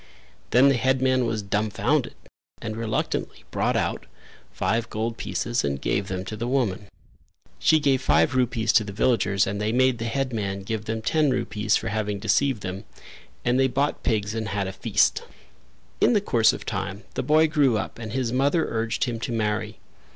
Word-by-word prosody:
Then 130 +4 +6
the 135 - +3
headman 130 0 +2
was 110 -2 -2
dumbfounded 105 +1 0 0.4
and 110 -1 -5
reluctantly 115 -1 -3
brought - - 0
out - - -2 0.4
five 115 +1 -1
gold 115 +2 -2
pieces 120 +1 -2
and 70 -1 -1
gave 95 +6 -1
them 95 -1 -4
to 110 - -5
the 115 +3 -4
woman. 115 -7 -1 0.7
She 160 0 +4
gave 135 -3 +2
five - - +3
rupees 120 -3 +1
to 110 - +5
the 100 -1 -7
villagers 100 -3 +2
and 100 +1 -3
they 105 +1 0
made 130 0 +2
the 115 - -3
headman 115 -6 -2
give 110 +1 -4
them 110 0 -3
ten 155 +2 +2
rupees 110 -4 0
for 115 - -1
having 105 -1 -2
deceived 110 +3 +1
them, 95 +1 -5 0.6
and 125 +2 +2
they 135 - +4
bought 140 +3 -1
pigs 105 -2 0
and 110 -1 -3
had 100 -2 -1
a 95 - -5
feast. - - +2 0.8
In - - +4
the 210 - +4
course 115 - +3
of - - -7
time 100 +2 -4
the - - -2
boy 155 +1 +4
grew 145 -7 +3
up 110 - -5
and 110 -2 -6
his 125 -1 -1
mother 140 +5 +2
urged 115 0 -1
him 120 -3 -2
to 120 - -4
marry. 110 -1 -1
115 Hz, 185 wpm, -25 LUFS, 105-130 Hz, 0.8 s, Then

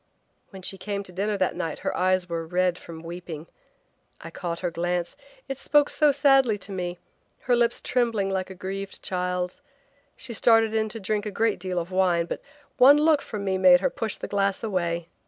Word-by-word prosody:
When 190 -2 -11
she 195 +1 -5
came 200 0 -3
to 185 - -12
dinner 200 +3 -1
that 185 -1 0
night 160 - -3
her - - 0
eyes 185 0 +1
were 165 -1 -4
red 180 +1 +1
from 160 -1 -10
weeping. 170 -2 -7 0.7
I - - -9
caught 170 -2 -5
her 175 -2 -1
glance; 175 +1 -2 0.3
it 270 -1 -5
spoke 295 0 +3
so 300 -2 +4
sadly 270 -5 +4
to 200 0 -9
me, 180 -2 -3 0.4
her 245 - +2
lips 235 -1 +1
trembling 230 -6 0
like 190 -1 -2
a 190 - -8
grieved 195 +2 -6
child's. 180 -1 -2 0.6
She 255 -2 -5
started 225 0 +4
in 220 -1 +1
to 225 - -6
drink 210 +1 -2
a - - -1
great 220 +1 0
deal 185 0 -4
of 175 +1 -2
wine 180 -3 +2
but - - -5 0.4
one 275 +4 +8
look 305 -1 +4
from 210 -3 -6
me 190 -1 0
made 180 -1 +7
her - - +1
push 225 -2 -3
her - - -6
glass 200 0 0
away. 170 -5 -1
190 Hz, 200 wpm, -25 LUFS, 180-220 Hz, 0.7 s, one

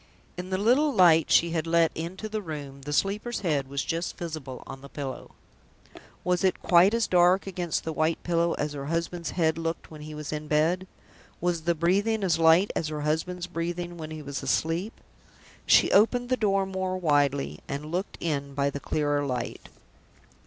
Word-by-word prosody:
In 180 +1 -6
the 190 - 0
little 255 +9 +3
light 165 - +5
she 170 0 +4
had 165 -1 -1
let 165 -1 +3
into 175 +6 -5
the 215 0 -3
room, 145 -6 -7
the 145 +2 -6
sleeper's 205 +9 -1
head 150 -8 0
was 140 +1 -2
just 165 +2 -3
visible 155 -7 -6
on 135 - -9
the 140 - -11
pillow. 135 -3 -7 0.9
Was 180 0 +1
it 190 - +1
quite 180 +5 +5
as 230 -2 +2
dark 180 +1 +4
against 180 -4 -2
the 160 - -3
white 155 +1 +1
pillow 170 0 +1
as 150 0 -3
her 140 -1 -6
husband's 170 +1 -2
head 160 -2 +1
looked 165 0 -4
when 155 -1 -10
he 155 0 -8
was 150 0 -5
in 150 0 -5
bed? 165 +5 +1 0.5
Was 175 -1 0
the 170 0 +2
breathing 200 +6 +1
as 175 -3 +2
light 165 +4 +5
as 160 - -1
her 155 -1 -4
husband's 165 +4 -1
breathing 175 0 -4
when 160 -2 -7
he 155 -1 -7
was 140 0 -5
asleep? 165 - -1 0.7
She - - +5
opened 245 +4 +3
the 255 - +3
door 195 -4 +1
more 190 -1 -2
widely, 145 -5 +1
and 145 +2 -5
looked 185 +4 -3
in 140 -4 -3
by 140 0 +1
the 140 - -5
clearer 145 0 0
light. 125 -4 -4
165 Hz, 190 wpm, -27 LUFS, 150-185 Hz, 0.9 s, light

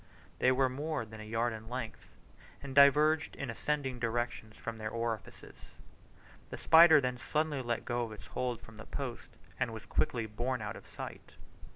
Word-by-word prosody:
They 130 - +5
were 130 +1 +3
more 145 0 -3
than 110 0 -11
a 110 - -9
yard 115 +1 0
in 110 0 -9
length, 120 -3 -5 0.6
and 135 -1 -6
diverged 150 +3 +5
in - - -6
an 135 - -3
ascending 135 0 -2
direction 120 -1 -2
from 115 +1 -7
the 110 -1 -4
orifices. 115 -1 -4 1.0
The - - -6
spider 160 -1 +8
then 125 -2 -2
suddenly 150 0 -1
let 120 -1 -2
go 120 -2 -1
its 110 - -10
hold 125 -2 -3
of 110 -1 -14
the 115 - -10
post, 130 -4 -6 0.2
and - - 0
was 110 -1 -8
quickly 115 -3 0
borne 120 +4 -2
out 105 -1 -5
of - - -12
sight. - - -9
120 Hz, 180 wpm, -32 LUFS, 115-140 Hz, 1.0 s, spider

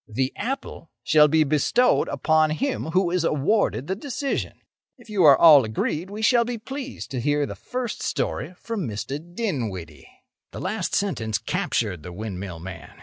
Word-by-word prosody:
The 130 +4 -1
apple 255 - -5
shall 150 +2 +6
be 155 +1 +4
bestowed 155 - +2
upon 155 +3 +2
him 265 - -2
who 175 +2 +1
is 180 -2 +1
awarded 155 - +1
the 190 - -2
decision. 275 +4 -3 0.4
If 240 -3 -15
you 200 -4 +2
are 140 -3 +8
all 150 -5 +8
agreed, 150 - -2
we 210 +2 -6
shall 235 +1 +5
be 240 0 -4
pleased 270 +4 -7
to 130 -3 -2
hear 145 +2 +1
the - - -6
first 250 -2 -5
story 175 +4 -2
from 220 - -4
Mr. 115 +6 -4
Dinwiddie." 125 - -5 0.4
The - - -6
last - - -2
sentence 115 - -1
captured 100 -8 -2
the 90 +3 -8
windmill 95 -2 -6
man. 95 +3 -9
155 Hz, 165 wpm, -24 LUFS, -, 0.4 s, are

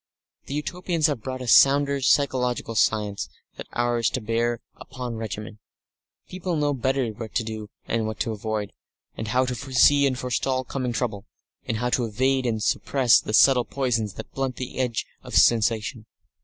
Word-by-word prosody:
The 140 - -4
Utopians 170 +1 -1
have 145 -7 +1
brought 130 +2 -5
a - - -7
sounder 140 +4 +5
physiological 125 -4 +1
science 105 -2 0 0.3
than - - -9
ours 120 -1 +1
to 130 - -2
bear 115 +1 -1 0.2
upon 125 -3 -6
regimen. 105 -1 -6 0.7
People 185 -1 -3
know 145 -1 +1
better 130 0 0
what 110 0 -8
to 120 - +1
do 110 -1 -6 0.2
and 115 -1 0
what 110 - -5
to 115 - -1
avoid, 105 -1 -3 0.5
how 130 +4 +2
to 125 - -2
foresee 140 +3 +4
and 130 -2 -1
forestall 130 +1 -1
coming 130 -1 -3
trouble, 110 -4 -3 0.4
and 110 - -1
how 125 +2 -1
to 120 +1 +1
evade 130 +4 +1
and 110 -2 -1
suppress 130 -1 +3
the - - -6
subtle 130 0 +6
poisons 115 -6 -1
that - - -9
blunt 135 -2 -2
the 130 0 -6
edge 125 -3 -1 0.2
of - - -7
sensation. 115 0 +2
125 Hz, 170 wpm, -24 LUFS, 110-135 Hz, 0.7 s, subtle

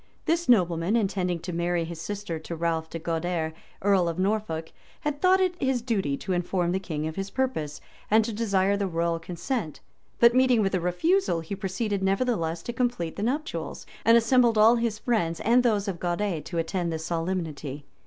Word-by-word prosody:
This 335 -2 0
nobleman, 180 -3 +3
intending 190 -5 0
to 180 +1 -5
marry 170 0 0
his 165 -1 -7
sister 200 -4 -4
to 170 +2 -6
Ralph 165 -1 -1
de - - -5
Guader, 165 0 -2 0.3
earl 195 -4 +3
of 165 - -4
Norfolk, 185 -5 -1 0.3
had 295 -1 -3
thought, 375 +1 +5
it 370 -1 +2
his 260 -3 +1
duty 195 - 0
to 190 - -3
inform 175 0 0
the 190 - 0
king 155 -5 -4
of 160 +2 -5
his 195 0 -3
purpose, 240 - -2 0.3
and 220 +1 +4
to 230 - -3
desire 200 -3 +1
the 200 -1 -1
royal 170 -1 0
consent; 175 - -4 0.4
but 235 0 +7
meeting 255 -3 +4
with 195 - 0
a 185 - +2
refusal, 180 - +1
he 165 +5 -5
proceeded 200 +1 -2
nevertheless 190 -5 0
to 240 - -4
complete 240 -9 -1
the - - -5
nuptials, 285 +8 -3 0.2
and 230 +1 +6
assembled 235 -1 +4
all 225 +3 +6
his 230 -2 -1
friends, 190 -9 0
and 240 +3 +4
those 215 -4 +1
of 185 -4 -3
Guader, 175 -1 -1
to 170 - -6
attend 170 +1 -1
the 160 - -2
solemnity. 160 -4 -3
190 Hz, 190 wpm, -26 LUFS, 170-230 Hz, 0.4 s, but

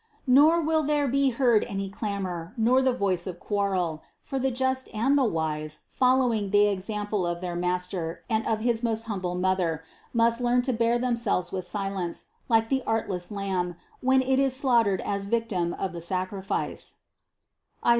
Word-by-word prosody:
257. 255 - +2
Nor 315 +4 +6
will 315 0 +2
there 295 -1 +1
be 275 +1 +2
heard 235 -3 +3
any 195 0 -3
clamor, 195 -3 -4
nor 245 +4 +4
the 260 0 +3
voice 195 -7 0
of 175 -2 -6
quarrel; 185 -6 -1 0.2
for 270 - -4
the 265 +1 +1
just 260 +1 0
and 255 +6 +2
the 280 - +4
wise, 155 -6 -2
following 250 -5 +2
the 205 +1 +5
example 205 0 -2
of 175 0 -2
their 175 -1 -4
Master 180 -1 -2
and 225 -1 0
of 220 -1 0
his 230 -1 +1
most 225 -2 0
humble 185 -5 -3
Mother, 180 -3 0 0.3
must 230 0 +3
learn 245 0 +2
to 260 0 0
bear 230 +1 +2
themselves 235 -7 0
with 185 -2 -3
silence, 195 -4 -3 0.2
like 225 -1 +3
the 265 -1 +1
artless 195 -5 -1
lamb, 190 -4 -2 0.3
when 260 0 +3
it 265 0 +2
is 270 -1 +3
slaughtered 235 -8 +3
as 200 -1 -2
victim 205 -6 0
of 195 - -3
the 170 - -6
sacrifice 185 +2 -2
(Is. - - -5
210 Hz, 175 wpm, -26 LUFS, 185-250 Hz, 0.3 s, Nor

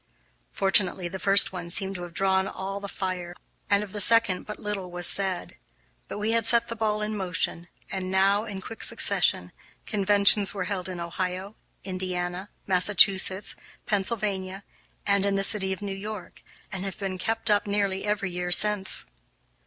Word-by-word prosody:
Fortunately, 190 -2 +1
the 190 +2 -7
first 195 0 +5
one 175 -2 -7
seemed 195 +2 -1
to 180 - -8
have 175 -1 -9
drawn 190 0 +1
all 195 +1 -6
the 200 - -7
fire, 180 -2 -5 0.3
and 200 0 +2
of 205 - -10
the 210 - -1
second 230 -6 +5
but 210 - -7
little 200 -3 -5
was 175 0 -2
said. 190 -1 +1 0.5
But - - -7
we 210 +2 -2
had 230 -1 +1
set 235 0 +2
the 230 - -5
ball 215 -1 -1
in 215 0 -4
motion, 175 -3 -3 0.2
and 190 -1 -4
now, 195 +3 +2
in 195 -4 -7
quick 225 - -10
succession, - - +1 0.3
conventions 200 0 +5
were 195 - -3
held 185 -1 -5
in 180 -1 -7
Ohio, 185 +4 -5 0.3
Indiana, 185 0 -4 0.2
Massachusetts, 190 +1 +3 0.3
Pennsylvania, 200 -2 -3 0.4
and 200 -1 +1
in 200 0 0
the 195 - 0
City 195 -1 +3
of 190 +2 -5
New 200 -1 -4
York, 205 0 -9 0.3
and 190 -2 -5
have 195 -1 -6
been 195 -2 -5
kept 225 +2 -1
up 205 0 +1
nearly 200 -1 -1
every 205 -2 -2
year 180 0 -4
since. 200 +1 +3
195 Hz, 170 wpm, -25 LUFS, 185-205 Hz, 0.5 s, first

